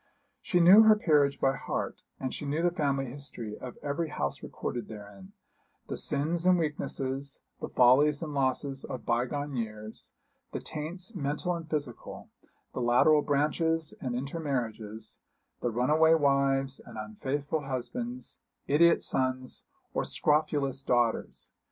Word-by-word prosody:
She 180 - +1
knew 185 +5 +9
her 220 -1 +7
peerage 150 -8 +3
by 135 0 +2
heart, - - -4 0.2
and 130 -1 -3
she - - -6
knew 145 +3 -1
the 175 - +3
family 140 -5 0
history 120 -5 -7
of 125 -2 -9
every 150 +3 -2
house 70 - -3
recorded 120 -3 -5
therein; 100 -3 -11 0.6
the - - -2
sins 165 +4 0
and 185 0 +5
weaknesses, 140 -3 -3 0.2
the - - -5
follies 145 +5 +5
and 150 -2 -5
losses 135 0 -1
of 130 - -6
bygone 135 +4 -1
years; 110 -2 -6 0.4
the - - -2
taints, 175 +7 -5
mental 150 +2 -1
and 165 -2 -6
physical; 145 -6 -5 0.4
the - - -3
lateral 125 +6 +5
branches 155 +3 0
and 125 -3 -2
intermarriages; 120 -7 -4 0.4
the 120 - 0
runaway 150 +8 +4
wives 140 -2 +2
and 115 -2 -12
unfaithful 140 +8 -3
husbands; 235 - -5 0.3
idiot 165 +4 +5
sons 130 -1 -2 0.3
or - - 0
scrofulous 145 -3 +1
daughters. 120 -4 0
140 Hz, 135 wpm, -29 LUFS, 125-155 Hz, 0.6 s, knew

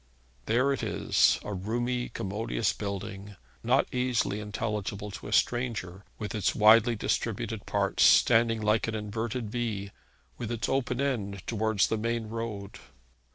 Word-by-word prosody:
There 125 +5 +3
it 135 - -3
is, - - +2
a 105 - -5
roomy, 120 +6 -2
commodious 105 +2 -2
building, 100 0 -6 0.3
not 125 +4 +3
easily 125 -5 0
intelligible 105 -1 -4
to 100 - -8
a - - -7
stranger, 110 -6 0
with 105 +1 -5
its 105 -4 0
widely 110 +2 +6
distributed 105 - -2
parts, - - 0
standing 115 -1 +5
like 105 +1 +2
an 115 - -2
inverted 110 +1 -3
V, 110 -5 -3 0.5
with 120 -1 -4
its 115 -1 -2
open 130 -2 0
side 105 -9 -2
towards 110 -2 +1
the 110 - -1
main 115 0 -2
road. 110 -3 -5
110 Hz, 140 wpm, -28 LUFS, 105-120 Hz, 0.5 s, widely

